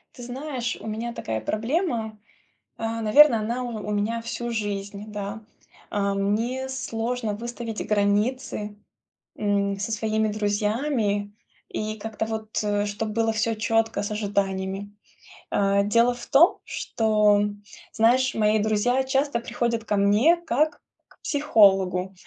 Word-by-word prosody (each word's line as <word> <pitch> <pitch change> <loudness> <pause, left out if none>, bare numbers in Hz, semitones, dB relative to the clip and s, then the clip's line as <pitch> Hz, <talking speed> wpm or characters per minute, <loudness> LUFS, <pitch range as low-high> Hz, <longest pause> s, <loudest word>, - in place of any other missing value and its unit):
Ты 245 - -11
знаешь, 250 -1 -4
у - - -11
меня 225 +2 -3
такая 110 - -4
проблема, 225 - -1 0.6
а, 225 0 -3
наверно, 235 +3 +6
она 235 +4 -2
у 225 -4 -5
у - - -2
меня 210 +3 -1
всю 235 +1 -4
жизнь, 205 -2 -4
да. 205 +1 -5 0.5
А, 200 -1 0
мне 225 +7 -1
сложно 245 -4 -3
выставить 235 0 -5
границы, 210 +1 0 0.6
м, 200 -1 0
со 200 +3 -3
своими 220 0 0
друзьями, 210 0 -1 0.4
и 215 0 -3
как-то 220 +1 -4
вот, 220 -1 -3
э, 205 0 0
чтоб 210 +2 -3
было 225 +1 0
всё 225 +1 0
четко 225 -1 0
с 205 - -4
ожиданиями. 200 -1 -2 0.5
А, 200 0 +2
дело 230 +4 +3
в 240 - -9
том, 320 +6 +5
что, 210 -2 +2
м, 205 0 -2 0.3
знаешь, 250 +4 +3
мои 215 0 +3
друзья 220 +5 +2
часто 270 -1 +1
приходят 230 -1 -2
ко 210 - 0
мне 205 +11 +4
как 305 +3 +1 0.3
к - - -25
психологу. 195 -10 +3
220 Hz, 135 wpm, -25 LUFS, 205-235 Hz, 0.6 s, наверно